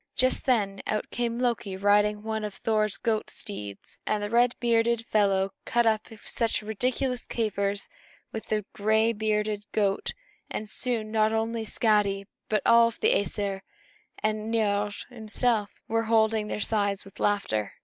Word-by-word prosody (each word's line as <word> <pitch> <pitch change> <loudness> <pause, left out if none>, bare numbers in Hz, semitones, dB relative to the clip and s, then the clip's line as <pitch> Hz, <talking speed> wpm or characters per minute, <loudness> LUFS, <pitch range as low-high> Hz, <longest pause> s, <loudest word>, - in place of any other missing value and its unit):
Just 255 +2 +1
then, 205 -6 +2
out 215 - -2
came 235 -1 -1
Loki, 235 -6 -1
riding 205 +1 +4
on 210 - -15
one 220 0 -2
of 210 -2 -4
Thor's 215 -2 0
goat 220 -2 -1
steeds; 105 - -8
and 210 -1 +1
the 205 - -3
red 240 +1 +4
bearded 235 -1 +2
fellow 195 -3 +2
cut 240 0 +2
up 220 -1 +2 0.2
such 230 -1 0
ridiculous 250 +4 -1
capers 200 -3 -1 0.4
with 220 - -6
the 215 -2 0
gray 220 +2 +3
bearded 210 -1 -1
goat 200 -2 +1 0.4
that 215 - -4
soon 225 -2 -1
not 220 0 +3
only 225 +1 -1
Skadi, 210 -3 +1 0.2
but 215 -1 +1
all 230 0 +7
the 230 - +2
Æsir 200 -1 -1 0.6
and 215 +1 -1
Niörd 205 -2 0
himself 225 -2 0 0.2
were 225 0 0
holding 220 -1 +3
their - - -3
sides 200 -2 0
with 195 - -15
laughter. 155 - 0
215 Hz, 150 wpm, -27 LUFS, 205-230 Hz, 0.6 s, all